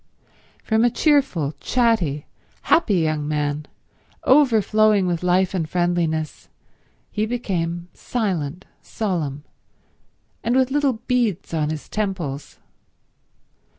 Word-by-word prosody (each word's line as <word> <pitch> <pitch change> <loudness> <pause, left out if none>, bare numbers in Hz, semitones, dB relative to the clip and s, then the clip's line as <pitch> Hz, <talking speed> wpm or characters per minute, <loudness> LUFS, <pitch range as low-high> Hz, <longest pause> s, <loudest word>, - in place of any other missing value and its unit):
From 220 0 +2
a 240 - +5
cheerful, 255 - +2
chatty, 220 - +1 0.4
happy 225 - +3
young 155 -3 0
man, 150 0 -2 0.6
overflowing 215 -6 +4
with 175 -2 -1
life 180 +1 +2
and 165 -4 -2
friendliness, 170 -3 -1 0.6
he 215 +1 -1
became 175 -7 -2
silent, 185 - -3 0.2
solemn, 160 -9 -3 1.0
and 235 +2 +1
with 260 0 +3
little 285 -1 +2
beads 235 -6 -1
on 155 -2 0
his 155 -1 -5
temples. 185 -10 -4
185 Hz, 100 wpm, -22 LUFS, 155-225 Hz, 1.0 s, a